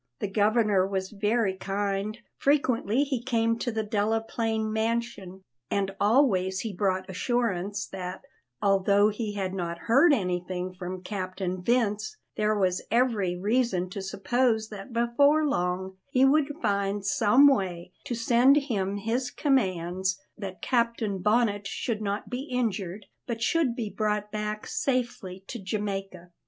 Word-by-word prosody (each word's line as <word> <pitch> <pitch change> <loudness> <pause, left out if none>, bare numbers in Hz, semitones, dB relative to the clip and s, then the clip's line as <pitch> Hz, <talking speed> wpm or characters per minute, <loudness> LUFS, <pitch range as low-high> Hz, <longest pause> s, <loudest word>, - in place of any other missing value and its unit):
The 205 - -2
Governor 210 -1 +2
was 190 -1 -3
very 210 -1 +1
kind; 200 +2 -2 0.2
frequently 265 -4 +2
he 270 -4 -2
came 230 -2 +1
to 240 - -1
the 220 -1 -1
Delaplaine 220 +1 -1
mansion, 220 -4 -2 0.3
and 195 -1 -1
always 200 -5 +3
he 220 -3 -4
brought 185 -1 0
assurances 205 -1 -1
that, 185 -1 -6 0.4
although 200 +1 +4
he 210 0 -3
had 190 -2 -3
not 170 -3 -3
heard 270 - +4
anything 180 -4 -1
from 180 0 -6
Captain 185 -1 -4
Vince, 215 - 0 0.2
there 215 0 +1
was 185 -2 +1
every 225 -7 +1
reason 200 -3 0
to 200 - -5
suppose 220 +3 0
that 210 +3 -9
before 280 +6 +3
long 190 -6 -1
he 265 -1 +4
would 290 +1 +3
find 200 -1 0
some 210 +7 +5
way 185 -10 0
to 240 - -2
send 240 +4 +4
him 205 -9 -1
his 230 +5 -1
commands 190 - 0 0.2
that 195 -3 -8
Captain 235 -5 0
Bonnet 210 0 +1
should 220 +1 -3
not 200 0 -2
be 250 +3 -4
injured, 210 -5 -2 0.2
but 235 -2 -3
should 280 -3 +2
be 220 -4 -4
brought 210 -1 -1
back 210 0 -3
safely 235 -8 -2
to 240 - -6
Jamaica. 195 -3 -4
210 Hz, 140 wpm, -27 LUFS, 190-235 Hz, 0.4 s, some